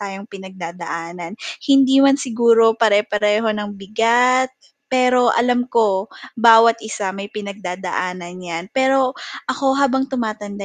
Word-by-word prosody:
tayong 195 Hz, 0 st, -7 dB
pinag-dadaanan 175 Hz, -1 st, -8 dB, 0.3 s
hindi 270 Hz, -1 st, +5 dB
man 275 Hz, 0 st, +5 dB
siguro 230 Hz, -3 st, +3 dB
pare-pareho 210 Hz, 0 st, +1 dB
ng 205 Hz, -1 st, -6 dB
bigat, 235 Hz, +6 st, +2 dB, 0.4 s
pero 250 Hz, -1 st, +2 dB
alam 245 Hz, +1 st, +1 dB
ko, 210 Hz, -4 st, +1 dB, 0.3 s
bawat 230 Hz, 0 st, +6 dB
isa 205 Hz, -3 st, -5 dB
may 195 Hz, +1 st, -7 dB
pinag-dadaan 185 Hz, -3 st, -5 dB, 0.2 s
yan, 170 Hz, +1 st, -7 dB
pero 265 Hz, -1 st, +2 dB, 0.3 s
ako 270 Hz, -1 st, -1 dB
habang 270 Hz, -1 st, +1 dB
tumatanda 215 Hz, -5 st, -5 dB
220 Hz, 115 wpm, -19 LUFS, 195-250 Hz, 0.4 s, bawat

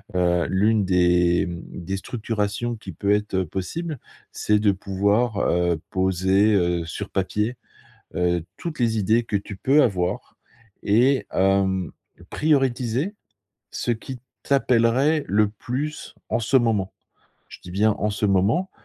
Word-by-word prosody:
heu, 90 Hz, -1 st, +2 dB
l'une 105 Hz, +2 st, +2 dB
des, 90 Hz, -1 st, +3 dB
mmh, 85 Hz, -1 st, -6 dB, 0.2 s
des 95 Hz, +2 st, -2 dB
structurations 110 Hz, +1 st, -3 dB
qui 105 Hz, -4 st, -9 dB
peut 100 Hz, +5 st, -1 dB
être, 105 Hz, 0 st, -1 dB
heu, 95 Hz, -1 st, +1 dB
possible, 150 Hz, -, -4 dB, 0.3 s
c'est 105 Hz, 0 st, +1 dB
de 105 Hz, -1 st, +3 dB
pouvoir, 100 Hz, +4 st, 0 dB
heu, 85 Hz, -3 st, +1 dB
poser, 95 Hz, +3 st, +2 dB
heu, 85 Hz, -3 st, +1 dB
sur 80 Hz, -, -6 dB
papier, 105 Hz, +5 st, -1 dB, 0.6 s
heu, 90 Hz, -2 st, +1 dB
toutes 165 Hz, -2 st, -6 dB
les 115 Hz, -2 st, +1 dB
idées 110 Hz, +4 st, +2 dB
que 105 Hz, -, -1 dB
tu 100 Hz, 0 st, -6 dB
peux 140 Hz, +8 st, +4 dB
avoir 90 Hz, -4 st, -1 dB, 0.5 s
et 125 Hz, +6 st, +3 dB
hem, 95 Hz, -2 st, +1 dB, 0.4 s
prioriser 135 Hz, -, 0 dB, 0.6 s
ce -, -, -3 dB
qui 125 Hz, +2 st, -7 dB, 0.2 s
t'appellerait 135 Hz, +3 st, +2 dB
le 105 Hz, +1 st, +3 dB
plus, 130 Hz, +8 st, -5 dB, 0.2 s
en -, -, +1 dB
ce 120 Hz, +4 st, +2 dB
moment. 110 Hz, -6 st, 0 dB, 0.6 s
Je -, -, -11 dB
dis 90 Hz, -, -10 dB
bien, 105 Hz, +3 st, +3 dB
en 105 Hz, -, 0 dB
ce 105 Hz, +1 st, -3 dB
moment, 100 Hz, -, +1 dB
105 Hz, 140 wpm, -23 LUFS, 95-120 Hz, 0.6 s, peux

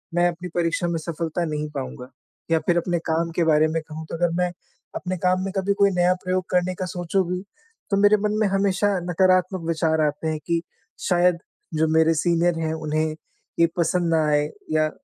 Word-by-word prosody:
मैं 175 Hz, 0 st, +4 dB
अपनी 175 Hz, +1 st, -6 dB
परीक्षा 170 Hz, 0 st, 0 dB
में 170 Hz, -, -1 dB
सफलता 165 Hz, +1 st, -3 dB
नहीं 150 Hz, -1 st, -3 dB
पाऊँगा। 130 Hz, -1 st, -6 dB, 0.4 s
या 160 Hz, -, +4 dB
फ़िर 175 Hz, +1 st, +1 dB
अपने 175 Hz, 0 st, 0 dB
काम 165 Hz, +1 st, 0 dB
के 170 Hz, -, +2 dB
बारे 155 Hz, 0 st, +4 dB
में 160 Hz, 0 st, -1 dB
कहूँ 160 Hz, 0 st, -8 dB
तो -, -, -4 dB
अगर 175 Hz, 0 st, +1 dB
मैं, 180 Hz, 0 st, +1 dB, 0.4 s
अपने 185 Hz, 0 st, -3 dB
काम 185 Hz, +1 st, +1 dB
में 195 Hz, -, -3 dB
कभी 195 Hz, +1 st, +1 dB
कोई 200 Hz, 0 st, +6 dB
नया 180 Hz, 0 st, +3 dB
प्रयोग 185 Hz, 0 st, 0 dB
करने 180 Hz, 0 st, +1 dB
का 185 Hz, -, -3 dB
सोचूँ 175 Hz, +2 st, -1 dB
भी, 180 Hz, 0 st, -2 dB, 0.5 s
तो 200 Hz, -, +2 dB
मेरे 205 Hz, +1 st, +5 dB
मन 210 Hz, +1 st, -1 dB
में 215 Hz, -, +4 dB
हमेशा 195 Hz, +1 st, +1 dB, 0.2 s
नकारात्मक 185 Hz, +1 st, +2 dB
विचार 160 Hz, -1 st, +1 dB
आते 150 Hz, +2 st, -3 dB
हैं 155 Hz, -1 st, -1 dB
कि 170 Hz, -1 st, +1 dB, 0.5 s
शायद 180 Hz, -1 st, +3 dB, 0.4 s
जो 160 Hz, +1 st, +2 dB
मेरे 160 Hz, +1 st, +4 dB
सीनियर 170 Hz, +1 st, +1 dB
हैं 160 Hz, -1 st, -1 dB
उन्हें 155 Hz, 0 st, -1 dB, 0.4 s
ये 170 Hz, -, +6 dB
पसंद 170 Hz, 0 st, +1 dB
न -, -, +4 dB
आए 150 Hz, 0 st, +3 dB, 0.3 s
या 155 Hz, 0 st, +2 dB
170 Hz, 200 wpm, -23 LUFS, 160-180 Hz, 0.5 s, कोई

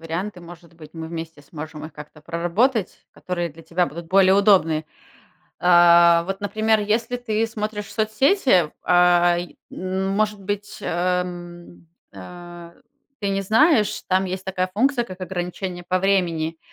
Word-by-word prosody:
варианты. 175 Hz, +4 st, -5 dB
Может 170 Hz, -1 st, -14 dB
быть, 155 Hz, -2 st, -14 dB
мы 160 Hz, -1 st, -6 dB
вместе 165 Hz, -2 st, -7 dB
сможем 155 Hz, +1 st, -9 dB
их 155 Hz, -, -9 dB
как-то 150 Hz, +1 st, -12 dB
проработать, 175 Hz, -, -1 dB
которые 175 Hz, -2 st, -4 dB
для 165 Hz, +2 st, -15 dB
тебя 175 Hz, +2 st, 0 dB
будут 170 Hz, +1 st, -8 dB
более 190 Hz, 0 st, +5 dB
удобные. 185 Hz, -6 st, +3 dB, 0.8 s
А 170 Hz, -1 st, +6 dB
вот, 195 Hz, +2 st, -5 dB
например, 215 Hz, +1 st, +1 dB
если 225 Hz, +4 st, -1 dB
ты 225 Hz, -2 st, -1 dB
смотришь 210 Hz, -2 st, -5 dB
соцсети, 220 Hz, -, +2 dB
а, 175 Hz, -1 st, +4 dB
е 175 Hz, 0 st, -7 dB
ну, 190 Hz, +1 st, -3 dB
может 210 Hz, 0 st, 0 dB
быть, 205 Hz, +1 st, -5 dB
эм, 175 Hz, -1 st, -4 dB, 0.3 s
а, 175 Hz, -, -11 dB, 0.5 s
ты 200 Hz, -, -1 dB
не 195 Hz, 0 st, 0 dB
знаешь, 225 Hz, -, +3 dB
там 190 Hz, +1 st, +2 dB
есть 185 Hz, +1 st, -5 dB
такая 185 Hz, -1 st, -2 dB
функция, 250 Hz, +2 st, +1 dB
как 185 Hz, -4 st, -11 dB
ограничение 180 Hz, 0 st, -5 dB
по 185 Hz, 0 st, +1 dB
времени. 170 Hz, -4 st, 0 dB
180 Hz, 145 wpm, -22 LUFS, 170-205 Hz, 0.8 s, А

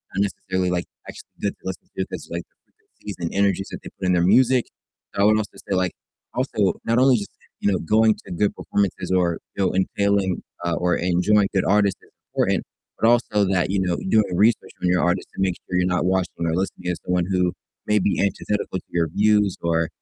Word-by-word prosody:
not 100 Hz, -, +1 dB
necessarily, 95 Hz, -2 st, -2 dB
like, 90 Hz, -1 st, -1 dB, 0.2 s
actually -, -, -11 dB
good 100 Hz, -, 0 dB
to -, -, -39 dB
listen 95 Hz, -1 st, -5 dB
to -, -, 0 dB
because -, -, -7 dB
like -, -, -3 dB, 0.2 s
the -, -, -42 dB
frequencies 105 Hz, -2 st, -11 dB
and 85 Hz, -1 st, -3 dB
energies 100 Hz, -1 st, +1 dB
that -, -, -6 dB
they -, -, -8 dB
put 95 Hz, -, -1 dB
in 90 Hz, -, +3 dB
their 85 Hz, -, +3 dB
music, 125 Hz, +6 st, +4 dB, 0.5 s
so 100 Hz, -, 0 dB
I -, -, +5 dB
would 110 Hz, +1 st, +5 dB
also 110 Hz, -1 st, -4 dB
say 95 Hz, -, +1 dB
like 90 Hz, -1 st, 0 dB, 0.4 s
also 110 Hz, -6 st, 0 dB
not 115 Hz, +2 st, +2 dB
only 130 Hz, -2 st, +5 dB
just, 100 Hz, -, -6 dB, 0.3 s
you 100 Hz, -, +2 dB
know, 95 Hz, -, +1 dB
going 110 Hz, +5 st, +3 dB
to -, -, -10 dB
good 100 Hz, +4 st, +1 dB
performances 95 Hz, -2 st, -1 dB
or, 90 Hz, -3 st, +2 dB, 0.2 s
you 95 Hz, -, +2 dB
know, -, -, 0 dB
entailing 95 Hz, 0 st, +1 dB, 0.2 s
uh, 85 Hz, -, +1 dB
or 90 Hz, +2 st, +1 dB
enjoying 90 Hz, +4 st, +3 dB
good 95 Hz, -, +3 dB
artists 100 Hz, -1 st, +2 dB
is -, -, -22 dB, 0.2 s
important, -, -, +1 dB, 0.4 s
but 115 Hz, -, +3 dB
also 110 Hz, -4 st, +3 dB
that, 90 Hz, 0 st, +1 dB
you 100 Hz, -, +1 dB
know, 90 Hz, -2 st, 0 dB
doing 105 Hz, -5 st, +3 dB
research 110 Hz, +4 st, +2 dB
on 90 Hz, -, +1 dB
your 90 Hz, 0 st, +3 dB
artist 90 Hz, +2 st, 0 dB
to -, -, -3 dB
make 95 Hz, -2 st, +1 dB
sure 90 Hz, -, -1 dB
you're 90 Hz, -, +2 dB
not 90 Hz, -1 st, +1 dB
watching 90 Hz, -2 st, 0 dB
or 80 Hz, -, 0 dB
listening 95 Hz, 0 st, -3 dB
to 90 Hz, -, -2 dB
someone 90 Hz, -1 st, +1 dB
who 90 Hz, -2 st, +1 dB, 0.3 s
may 105 Hz, 0 st, +3 dB
be 100 Hz, -, 0 dB
antithetical 100 Hz, 0 st, -1 dB
to -, -, -22 dB
your 85 Hz, -1 st, +1 dB
views 105 Hz, -1 st, +3 dB
or, 85 Hz, -1 st, +1 dB
95 Hz, 225 wpm, -23 LUFS, 90-105 Hz, 0.5 s, I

